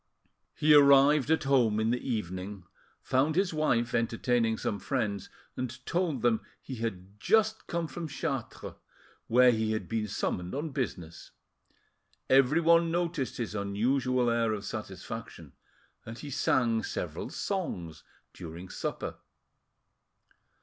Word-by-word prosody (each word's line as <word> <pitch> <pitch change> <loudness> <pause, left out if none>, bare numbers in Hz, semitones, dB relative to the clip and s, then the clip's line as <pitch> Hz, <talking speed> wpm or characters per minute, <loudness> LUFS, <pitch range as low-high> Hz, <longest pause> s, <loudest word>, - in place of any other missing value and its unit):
He 150 0 +4
arrived 140 0 +6
at 160 0 +2
home 125 -6 +3
in 110 +1 +1
the 125 - -1
evening, 95 -3 -4 0.4
found 140 +4 +1
his 190 -1 +1
wife 120 -7 +1
entertaining 115 0 +1
some 100 - -2
friends; 100 -1 -2 0.3
and 130 0 -5
told 170 -8 -1
them 120 -2 +3 0.2
he 130 - -8
had 100 -3 -5
just 220 - +2
come 170 -1 -2
from 160 +4 -6
Chartres, 140 -4 -4 0.5
where 125 +2 +6
he 110 -1 0
had 110 - -3
been 110 -2 -2
summoned 90 -1 -3
on 150 +2 -3
business. 90 - -5 1.0
Everyone 165 +6 +5
noticed 170 -5 -1
his 115 -3 -3
unusual 120 +5 +1
air 115 -1 +1
of 105 -1 -5
satisfaction, 110 - -7 0.5
and 115 +1 -8
he 145 +1 -8
sang 115 -3 +2
several - - -4
songs 90 - -4 0.3
during 85 +1 -9
supper. - - -4
120 Hz, 125 wpm, -29 LUFS, 110-145 Hz, 1.0 s, arrived